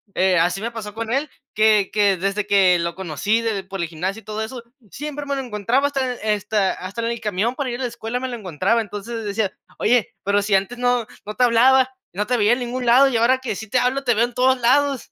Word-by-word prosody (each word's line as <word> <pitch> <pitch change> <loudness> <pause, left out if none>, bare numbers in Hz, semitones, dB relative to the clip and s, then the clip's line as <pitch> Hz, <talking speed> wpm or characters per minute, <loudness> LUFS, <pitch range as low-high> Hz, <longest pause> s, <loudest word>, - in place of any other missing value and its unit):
eh, 185 -1 +3
así 180 +4 +1
me 235 - -3
pasó 215 -3 -7
con 225 0 -5
él, 280 +3 0 0.2
que 215 -2 +3
que 205 -1 +3
desde 195 +3 -2
que 185 -3 +4
lo 170 0 -2
conocí 190 +5 -1
de 220 -4 -2
por 195 -1 -5
el 170 - -1
gimnasio 185 +6 -4
y - - -31
todo 215 +1 -4
eso, 235 +2 -6 0.3
siempre 295 +5 -6
me 280 0 -2
lo 270 - -2
encontraba 245 +3 0
hasta 265 -3 -1 0.2
hasta 205 -1 0
hasta 195 +5 -6
en 230 0 -1
el 235 - -4
camión 215 +3 -1
para 280 -3 -3
ir 240 - -5
a - - -3
la 245 - -1
escuela 235 +1 -4
me 260 - -3
lo 245 - -4
encontraba, 195 +3 0
entonces 210 +2 -7
le 225 - -5
decía: 205 -1 -1 0.3
"Oye, 240 0 +1
pero 200 +1 +2
si 200 -1 +1
antes 195 +6 -1
no 245 -2 +1 0.2
no 210 +1 -6
te 250 - +2
hablaba, 260 +2 +4 0.2
no 205 +3 -2
te 250 +1 +1
veía 210 +2 +4
en 245 - -1
ningún 250 +1 -4
lado, 250 +4 +6
y 240 - 0
ahora 250 +3 +3
que 260 -6 -4
sí 220 +3 -7
te 250 - +2
hablo, 265 +2 0
te 245 -2 +2
veo 230 +2 +3
en 245 - -9
todos 260 +1 +2
lados". 275 +2 +2
225 Hz, 260 wpm, -21 LUFS, 200-250 Hz, 0.3 s, lado